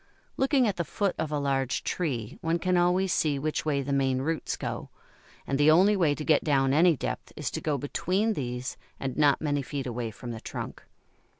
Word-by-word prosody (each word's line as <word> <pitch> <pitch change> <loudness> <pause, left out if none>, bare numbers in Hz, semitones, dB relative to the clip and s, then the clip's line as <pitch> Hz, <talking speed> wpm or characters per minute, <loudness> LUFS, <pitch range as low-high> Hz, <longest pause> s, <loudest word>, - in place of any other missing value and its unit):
Looking 265 -2 +3
at 195 -4 -1
the 170 - 0
foot 195 +4 -1
of 160 -1 -2
a 150 - 0
large 135 -2 0
tree 125 -11 -3
one 165 +1 +1
can 185 +2 0
always 180 +1 +3
see 150 -3 +1
which 155 +3 -2
way 140 -2 +1
the 140 +1 -2
main 135 -1 +1
roots 160 +2 -2
go, - - -5 0.6
and 135 0 -1
the 145 +1 +6
only 190 +6 +6
way 160 -7 +2
to 150 - -6
get 160 - +4
down 135 -2 +2
any 165 +1 +5
depth - - -4
is - - -3
to - - -4
go 150 -2 0
between 185 - 0
these 125 -4 -4 0.2
and 135 -2 -3
not 145 -2 +3
many 145 -2 0
feet 145 -2 -4
away 120 -2 -3
from 120 +3 -8
the 110 -1 -7
trunk. - - -6
145 Hz, 210 wpm, -28 LUFS, 135-175 Hz, 0.6 s, the